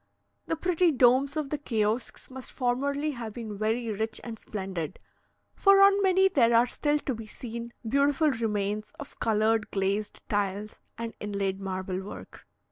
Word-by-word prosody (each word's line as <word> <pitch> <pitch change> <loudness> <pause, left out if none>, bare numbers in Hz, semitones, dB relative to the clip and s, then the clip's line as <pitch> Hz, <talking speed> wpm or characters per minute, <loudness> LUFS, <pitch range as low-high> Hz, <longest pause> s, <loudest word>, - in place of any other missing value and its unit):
The - - 0
pretty 355 +1 +2
domes 265 +2 +4
of 295 -3 -2
the 300 - -1
kiosks 225 -1 -2
must 260 -1 -7
formerly 280 +4 0
have 230 -5 -6
been 220 -3 -5
very 225 +2 0
rich 220 +2 -3
and 225 -2 -7
splendid, 190 -5 -5 0.6
for 395 0 +5
on 395 0 +6
many 380 0 +5
there 235 -11 +3
are 235 +1 +6
still 295 +4 0
to 285 -2 -3
be 225 -1 -7
seen 235 +1 -7 0.2
beautiful 285 +4 +3
remains 210 -3 -2
of 285 - -10
coloured 220 0 +2
glazed 200 +2 -1
tiles 205 +1 -2 0.2
and 230 0 -4
inlaid 200 -2 -2
marble 185 -1 -3
work. 195 - -10
230 Hz, 155 wpm, -28 LUFS, 210-280 Hz, 0.6 s, on